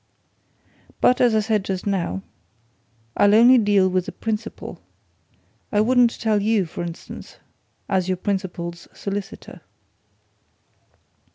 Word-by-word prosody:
But, 250 - +3
as 240 -3 +4
I 215 - +3
said 215 -2 0
just 190 -2 -4
now, 175 - -2 0.9
I'll 205 0 +5
only 240 +3 +7
deal 205 -3 +3
with 185 0 -1
the - - -4
principal. 225 0 -5 0.9
I 205 - +2
wouldn't 245 +1 +3
tell 215 -2 +1
you, 210 -2 +2
for 160 - -7
instance 170 -1 -8 0.5
as 190 -2 0
your 185 -1 0
principal's 175 -3 -4
solicitor." 200 0 -6
205 Hz, 115 wpm, -22 LUFS, 185-220 Hz, 0.9 s, only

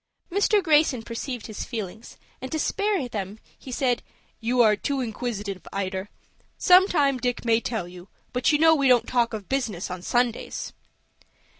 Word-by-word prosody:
Mr. 405 +2 +3
Greyson 300 -7 +3
perceived 240 +1 -5
his 215 - -5
feelings, 220 0 -7 0.2
and 260 - -6
to 315 - -1
spare 400 -1 0
them, 205 -3 -5 0.3
said, 250 -1 0 0.4
"You 240 +1 +3
are 215 -2 +5
too 275 +6 -2
inquisitive, 215 -5 -4
Ida. 190 0 -3 0.5
Sometime 355 -8 +4
Dick 245 -1 -2
may 230 -1 +4
tell 220 -8 -3
you, 180 +1 -12 0.3
but 250 +4 +2
you 295 - +4
know 320 +1 +6
we 280 -3 +2
don't 250 -2 +5
talk 240 -2 +1
of 215 -4 -6
business 220 -10 -2
on 180 -1 -5
Sundays." 240 +4 -1
245 Hz, 155 wpm, -25 LUFS, 210-275 Hz, 0.5 s, know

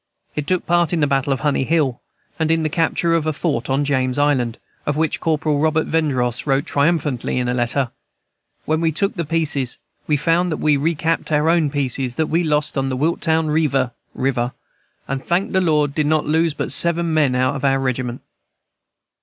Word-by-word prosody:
It 150 -1 -3
took 185 -1 0
part 175 -1 +2
in 170 - +1
the 150 - +3
battle 140 0 0
of 135 - -1
Honey 145 -3 +1
Hill, 145 -4 0 0.4
and 160 -1 +1
in 165 0 +2
the 155 - 0
capture 165 +1 +1
of 165 -2 +1
a 155 - +1
fort 145 -6 -2
on 135 +2 +1
James 130 -2 0
Island, 130 -5 +1 0.3
of 145 0 0
which 160 -1 0
Corporal 155 -2 0
Robert 160 +1 +2
Vendross 130 -6 0
wrote 135 0 +2
triumphantly 145 -5 0
in 125 -1 0
a 125 - 0
letter, 120 +1 0 0.7
"When 155 +1 0
we 165 -1 +2
took 195 +6 -1
the 170 - -3
pieces 150 -5 -1 0.3
we 150 - +2
found 170 +4 +1
that 155 - -1
we 150 -1 +2
recapt 165 +3 0
our 150 +2 +3
own 165 -3 +2
pieces 135 -3 -1
back - - -24
that 160 - +1
we 170 +2 +2
lost 150 -2 0
on 135 0 -1
Willtown 160 +3 0
Revear 140 -5 +1 0.2
(River) 125 -2 -1 0.5
and 135 0 -3
thank 175 +3 0
the 190 - +2
Lord 150 -4 +2
did 150 0 0
not 155 0 +2
lose 160 0 +1
but - - -3
seven 170 -1 +2
men 145 -5 +2
out 130 +2 +1
of 135 - -5
our 135 -1 +3
regiment." 130 -2 -2
150 Hz, 200 wpm, -20 LUFS, 135-160 Hz, 0.7 s, the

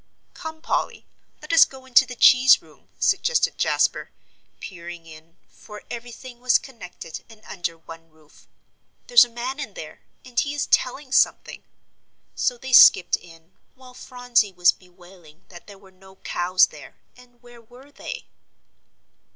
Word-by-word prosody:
"Come, 320 -1 -10
Polly, - - -3 0.4
let 305 +2 -5
us 330 - +8
go 265 -1 -8
into 260 0 +4
the 250 - -9
cheese 255 +2 +6
room," - - -23
suggested 480 +5 0
Jasper, - - 0 0.5
peering 170 -2 -10
in, 160 +1 -16
for 210 -1 -14
everything 240 +1 -10
was 250 0 +3
connected 180 - -11
and 220 -1 -18
under 170 -3 -6
one 165 0 -14
roof. 155 -1 -25 0.6
"There's 485 - +6
a - - -15
man 245 +4 -6
in 290 - -7
there, - - -11 0.2
and 245 -2 -3
he 290 0 -2
is 290 - -2
telling 260 +1 -1
something;" - - 0 0.7
so 245 - -2
they 260 +1 -8
skipped 190 - +7
in, 165 0 -17 0.2
while 255 -1 -17
Phronsie 245 -4 -1
was 180 0 +4
bewailing 180 -2 -20
that 175 -2 -15
there 200 -1 -13
were 195 -1 -20
no 190 +1 -20
cows 185 0 +1
there, - - -14 0.2
and 245 -1 -22
where 240 -1 -16
were 250 +5 -19
they? - - -9
235 Hz, 150 wpm, -22 LUFS, 180-260 Hz, 0.7 s, us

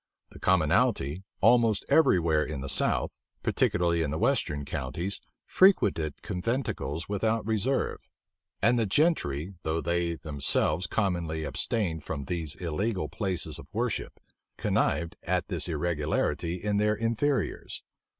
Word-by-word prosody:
The - - -12
commonalty, 70 +7 +2 0.2
almost 115 -4 +4
every 160 - +5
where 80 -2 +2
in 75 -3 -5
the 70 - -4
south, - - +1 0.2
particularly 85 -1 +2
in 80 - 0
the 75 - -2
western 70 -2 0
counties 80 +7 -3 0.2
frequented 95 - +3
conventicles 90 - -2
without 110 +2 0
reserve; 110 +5 -1 0.5
and 120 +3 +4
the 110 - +1
gentry 95 - +1
though 80 +1 -1
they 85 0 0
themselves 75 +3 0
commonly 85 -6 -1
abstained 80 0 -1
from 70 -3 -4
these 80 -1 -3
illegal 95 +4 -2
places 90 -7 -2
of - - -12
worship, - - -2 0.4
connived 85 0 0
at 90 +1 -1
this 85 -5 0
irregularity 80 +1 -1
in 100 +3 -1
their 105 +1 +2
inferiors. 115 +5 -1
85 Hz, 125 wpm, -28 LUFS, 80-105 Hz, 0.5 s, every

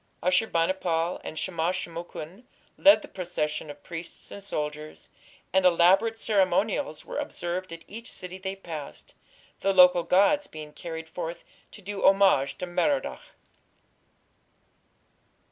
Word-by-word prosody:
Ashur 185 +5 +3
bani 165 0 +2
pal 170 -2 -1
and 155 - -7
Shamash 175 +2 -1
shum 170 - -8
ukin 175 +5 -8 0.3
led 300 +1 +6
the - - -9
procession 155 -5 -3
of 145 0 -10
priests 170 -1 -8
and 200 - -9
soldiers, 150 -3 -5 0.4
and 190 0 +4
elaborate 185 +6 +4
ceremonials 210 +5 +1
were - - -4
observed 175 0 -4
at 165 0 -8
each 230 +2 -9
city 185 +1 -6
they 190 +1 -4
passed, 160 -6 -8 0.5
the 195 - +2
local 180 -1 +7
gods 285 - +3
being 155 -1 -9
carried 160 -1 -7
forth 170 0 -6 0.3
to 205 - -13
do 200 +1 -5
homage 195 -8 +4
to - - -4
Merodach. 275 +11 0
180 Hz, 135 wpm, -27 LUFS, 165-195 Hz, 0.5 s, local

